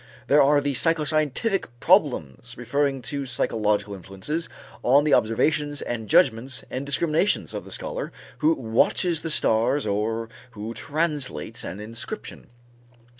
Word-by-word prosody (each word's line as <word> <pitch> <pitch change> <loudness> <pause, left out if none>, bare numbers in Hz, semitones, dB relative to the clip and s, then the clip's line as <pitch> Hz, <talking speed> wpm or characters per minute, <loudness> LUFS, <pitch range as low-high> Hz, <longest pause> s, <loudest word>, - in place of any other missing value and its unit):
There 145 +1 +5
are 145 +1 +4
the 140 0 -1
psychoscientific 155 - +1
problems 135 - +1
referring 135 +2 -1
to 140 +2 -3
psychological 105 -4 0
influences 95 - -4 0.3
on 140 +4 +5
the 150 -2 +2
observations 145 +6 +2
and 110 -3 -4
judgments 125 +3 +2
and 135 +2 -4
discriminations 160 +7 +1
of - - -5
the - - -11
scholar - - -4 0.3
who 160 +1 +3
watches 155 +8 +1
the 165 - -4
stars 125 -1 +2
or 110 +2 -1 0.3
who 110 +1 -6
translates 150 - -2
an 100 - -6
inscription. 110 +2 -7
135 Hz, 125 wpm, -24 LUFS, 110-150 Hz, 0.3 s, There